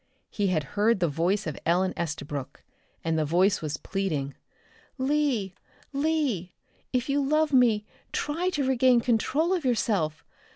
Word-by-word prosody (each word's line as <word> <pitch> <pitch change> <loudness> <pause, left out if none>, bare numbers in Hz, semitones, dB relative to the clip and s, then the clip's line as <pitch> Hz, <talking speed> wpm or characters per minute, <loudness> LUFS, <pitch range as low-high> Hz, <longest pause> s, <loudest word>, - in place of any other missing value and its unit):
He 205 -2 0
had 165 -5 +1
heard 210 +1 +3
the 175 - +2
voice 175 +7 0
of 155 -3 -4
Ellen 185 +3 +2
Estabrook, 145 -4 -5 0.4
and 165 -1 0
the - - +2
voice 180 +6 +2
was 150 -1 -3
pleading. 155 -9 -2 0.6
"Lee! 260 -8 0 0.4
Lee! 280 - 0 0.4
If 250 -1 0
you 285 0 +1
love 305 +1 +2
me 230 -5 +4 0.3
try 330 +5 -1
to 280 -4 0
regain 255 -2 +4
control 265 - +1
of 355 -4 -1
yourself. 205 - 0
210 Hz, 140 wpm, -27 LUFS, 170-270 Hz, 0.6 s, me